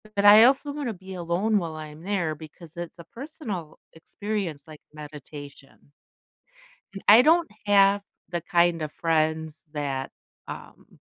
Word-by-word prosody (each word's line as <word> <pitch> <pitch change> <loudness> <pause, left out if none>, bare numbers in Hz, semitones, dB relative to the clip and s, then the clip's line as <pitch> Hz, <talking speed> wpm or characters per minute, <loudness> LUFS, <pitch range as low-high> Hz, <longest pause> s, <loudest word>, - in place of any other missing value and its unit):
but 200 0 +1
I 210 +2 +10
also 275 +3 +3
wanna 285 -5 -3
be 190 0 -11
alone 180 +5 0
while 165 -4 -3
I'm 155 0 -9
there, 180 -5 -1
because 160 +2 -13
it's 170 0 -7
a - - -8
personal 220 - -7
experience 180 -2 -4
like 155 -1 -12
meditation 145 -2 -11 1.0
and 195 - -8
I 220 +4 +10
don't 330 +4 +4 0.2
have 200 0 +5 0.3
the 175 -1 -2
kind 170 0 +2
of 150 -1 -4
friends 160 -2 -1
that, 140 -3 -3 0.4
um, - - -11
170 Hz, 140 wpm, -26 LUFS, 155-205 Hz, 1.0 s, I